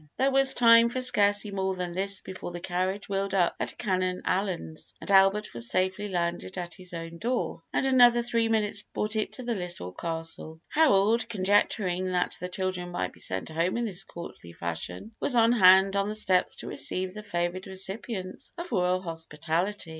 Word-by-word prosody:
There 270 +1 +2
was 270 0 +5
time 230 -1 +6
for 255 - -3
scarcely 210 -4 +3
more 190 -1 -1
than 180 -1 -4
this 195 +1 -1
before 185 -1 -7
the 175 0 -6
carriage 185 +3 -2
wheeled 195 0 -2
up 175 -3 +2
at - - -4
Canon 185 -3 -1
Allyn's, 185 -4 -2
and - - -5
Albert 195 +2 +4
was 115 0 -2
safely 185 +5 0
landed 175 +1 -3
at 175 -1 -5
his 180 +2 -10
own 165 -1 -7
door, 240 -7 -2
and - - 0
another 245 -2 +5
three 230 -1 +1
minutes 210 -2 +2
brought 215 +1 -3
it 215 - -1
to 255 - -5
the 240 -1 -1
Little 175 - -5
Castle. 165 - -5
Harold, 230 -7 +3
conjecturing 185 -2 +1
that 180 -1 0
the 180 - -5
children 185 -1 -3
might 95 - -3
be - - -13
sent 95 +8 -4
home 165 +6 0
in 240 - -1
this 195 -3 -2
courtly 170 - -10
fashion, 85 - -5
was 255 - +2
on 230 0 +5
hand 190 -3 +6
on 200 +1 +1
the 215 - -3
steps 185 -4 +1
to - - -9
receive 185 0 -1
the 210 - -7
favored 180 -2 -3
recipients 190 0 -4
of 345 -3 -6
royal 180 -3 +1
hospitality. 165 +3 -3
190 Hz, 185 wpm, -27 LUFS, 175-210 Hz, -, time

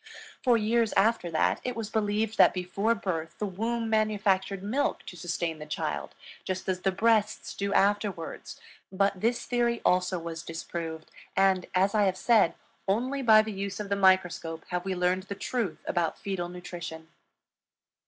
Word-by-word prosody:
For 245 -4 +5
years 225 +1 +1
after 200 -3 +2
that, 160 - +1
it 250 - -3
was 220 -2 -5
believed 215 0 0
that - - +7
before 195 +5 0
birth 165 -6 -3
the 210 - -2
womb 225 +4 -2
manufactured 205 -3 +1
milk 245 +8 -1
to - - -8
sustain 170 -1 -3
the 150 - -8
child, 155 - -3 0.3
just 185 0 -4
as 185 -1 0
the 195 - +2
breasts 215 +1 +1
do 200 0 -2
afterwards; 200 -4 0 0.3
but 195 0 +1
this 235 +2 0
theory 240 -1 +1
also 180 0 +2
was 165 -1 -5
disproved; 165 -1 -6 0.3
and, 190 -2 +3
as 190 +2 +3
I 210 -2 +4
have 185 -1 +1
said, 220 -8 +4 0.3
only 255 +8 0
by 220 -3 +7
the 215 -1 -5
use 195 0 -4
of 205 -1 -5
the 200 - +1
microscope 185 -4 +2
have 180 0 -2
we 190 -1 -1
learned 180 +1 0
the 200 - -3
truth 205 -8 -3
about 170 -2 0
fetal 185 -3 -3
nutrition. 175 -2 -7
195 Hz, 165 wpm, -28 LUFS, 180-220 Hz, 0.3 s, that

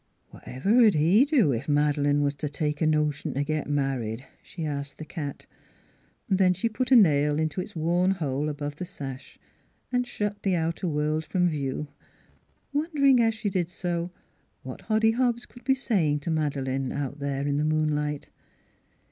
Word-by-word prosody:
" - - -44
Whatever 215 - +3
'd 195 - -1
he 180 - +5
do, 250 - +3
ef 120 +4 -4
Mad'lane 145 -1 +2
was 140 0 +1
t' 150 +1 -4
take 150 0 -2
a 160 - +3
notion 150 -3 0
t' 140 - +1
git 155 0 -2
married?" 135 -4 -1 0.2
she 165 -3 -7
asked 140 -2 -4
the 155 - -7
cat. 145 -4 -6 0.8
Then 185 -1 +3
she 230 - 0
put 245 +3 -2
a 265 - +6
nail 150 -8 +5
into 160 +3 -1
its 205 - -9
worn 175 +3 +1
hole 150 -5 -1
above 145 0 -5
the - - -4
sash 135 -7 -8 0.5
and 250 0 0
shut 210 -3 -3
the 190 -2 +1
outer 165 +2 -1
world 155 0 0
from 180 +1 +1
view, 145 -2 -2 0.9
won 300 +3 0
dering 275 -3 +5
as 225 -1 +2
she 215 -2 -2
did 175 -2 -1
so 175 -1 -3 0.5
what - - -8
Hoddy 220 0 +3
Hobbs 240 -1 0
could 245 - -16
be 265 +2 +3
saying 170 - 0
to 165 - -3
Madeleine 135 -4 -1
out 145 0 -4
there 140 -1 -2
in 145 0 0
the 150 - +1
moon 155 0 +1
light. 150 -1 -3
155 Hz, 180 wpm, -26 LUFS, 145-195 Hz, 0.9 s, a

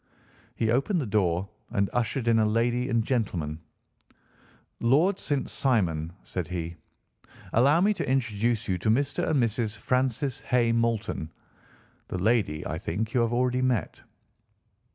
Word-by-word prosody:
He 110 -1 +1
opened 140 - +1
the 140 - -2
door 95 -4 +1 0.2
and 100 0 +1
ushered 120 +1 -1
in 115 -1 +4
a - - +4
lady 120 +3 +1
and 115 -2 +2
gentleman. 90 - -1 1.2
"Lord 155 +11 +3
St. 145 -3 -1
Simon," 85 - 0
said 90 -4 -4
he 85 -1 -4 0.8
"allow 140 +8 +4
me 210 +3 +4
to 195 - -3
introduce 115 -3 0
you 90 -2 0
to 110 - 0
Mr. 140 +5 +1
and 150 - +2
Mrs. 115 -2 0
Francis 130 +3 0
Hay 120 -3 +2
Moulton. 115 -8 -1 0.8
The - - -4
lady, 95 -6 +1
I 80 - -3
think, 110 +6 -3
you 125 - +3
have 115 0 +1
already 125 +1 +1
met." 130 -3 -1
115 Hz, 145 wpm, -27 LUFS, 100-130 Hz, 1.2 s, in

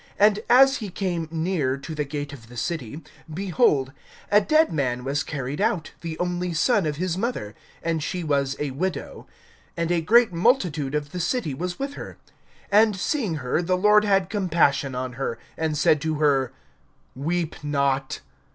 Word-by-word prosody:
(12)And 210 0 +5
as 270 +2 +6
he 215 -4 -5
came 175 -3 -2
near 160 -5 -1
to 150 +4 -7
the 150 -1 -1
gate 145 0 -5
of 115 -5 -12
the 120 - -11
city, 150 +1 -4 0.3
behold, 165 - +1 0.4
a 205 +1 +6
dead 310 - +3
man 125 -5 -1
was 140 +2 -1
carried 145 +2 -4
out, 205 -7 0
the 165 -1 -5
only 180 0 -2
son 200 +1 +2
of 150 - -2
his 180 +2 -2
mother, 195 - -3 0.3
and 165 -1 -1
she 180 +3 -3
was 140 -3 0
a 150 -2 -3
widow; 185 +8 -4 0.5
and 170 0 -1
a 170 -1 +2
great 230 +3 +4
multitude 165 - +1
of 145 -1 -2
the 180 - -5
city 180 - -1
was 175 +6 -4
with 275 +1 -4
her. - - -9 0.6
(13)And 215 0 +5
seeing 200 - -1
her, 125 - +1
the 180 +1 0
Lord 210 +2 +5
had 195 -3 +2
compassion 165 -9 +1
on 130 0 -3
her, 115 - -2 0.2
and 160 -2 -1
said 150 0 +3
to 160 0 -1
her: 140 -4 +2 0.6
Weep 160 +3 -2
not. 140 -2 0
165 Hz, 175 wpm, -24 LUFS, 145-190 Hz, 0.6 s, as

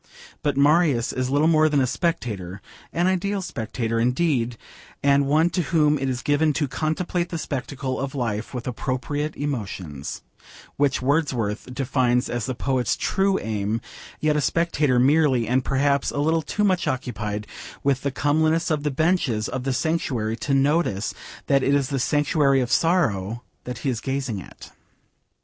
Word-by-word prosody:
But 145 -2 0
Marius 145 -4 +3
is 130 0 -1
little 145 +3 +3
more 155 -1 +4
than 145 -2 +2
a 130 - +3
spectator: 105 - -2 0.3
an 175 - 0
ideal 190 +2 0
spectator 115 - -3
indeed, 125 -1 +1 0.5
and 140 0 +4
one 160 +4 +3
to 180 - 0
whom 150 -2 +2
it 135 0 -1
is 125 -1 -3
given 150 +1 +2
'to 145 0 0
contemplate 170 +5 -2
the 170 - -3
spectacle 135 -3 -4
of 135 +1 -4
life 115 -4 -2
with 125 -2 -5
appropriate 135 +5 -2
emotions,' 100 - -5 0.5
which 140 -2 +1
Wordsworth 130 -6 0
defines 125 -2 +1
as 120 0 -2
the 130 - -2
poet's 130 -1 0
true 195 0 +1
aim; 110 0 -2 0.4
yet 155 -1 +2
a 150 - +2
spectator 150 -3 +1
merely, 135 -2 +3
and 125 +2 +2
perhaps 140 +1 +1
a - - -5
little 160 +3 +2
too 205 +7 -2
much 185 -3 +2
occupied 105 -5 -3 0.4
with 135 -1 +1
the 140 - 0
comeliness 155 +4 +1
of 150 -2 +1
the 150 - 0
benches 140 -7 +1
of 130 0 -4
the 135 - +1
sanctuary 125 -6 -1
to 140 +2 0
notice 135 - +1 0.3
that 140 -1 +3
it 140 +2 +2
is 140 -2 +1
the 135 - -1
sanctuary 145 0 +2
of 125 -2 -1
sorrow 120 - +1 0.2
that 125 -1 -5
he - - +2
is 115 -1 -4
gazing 130 -7 -2
at. - - -13
140 Hz, 165 wpm, -24 LUFS, 125-155 Hz, 0.5 s, more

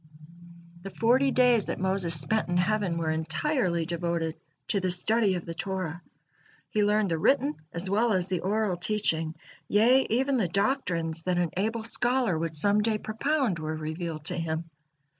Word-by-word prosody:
The 195 - -7
forty 250 +7 +2
days 245 -5 +3
that - - -3
Moses 185 -4 +1
spent 175 +8 0
in 175 - +1
heaven 185 -1 0
were 160 -1 -1
entirely 170 - -1
devoted 170 -1 -2 0.3
to 200 - +2
the 185 -1 -1
study 200 +2 +2
of 175 - -5
the 165 - -5
Torah, 175 -1 -4 0.7
he 210 - +1
learned 210 -2 +2
the 165 - 0
written 280 - +2
as 170 +3 -3
well 220 +5 +2
as 185 -3 +1
the 185 -2 -1
oral 200 0 -1
teaching, 165 -5 0 0.3
yea, 245 +6 +4
even 265 +4 +1
the 210 -7 +1
doctrines 175 - -1
that 180 +1 -1
an 175 -3 0
able 220 +4 -1
scholar 240 -3 +2
would 160 0 -3
some 205 +6 +5
day 220 0 +1
propound 225 - -1
were 155 0 -3
revealed 155 0 -5
to 180 +2 +1
him. 165 0 -4
185 Hz, 170 wpm, -27 LUFS, 165-220 Hz, 0.7 s, some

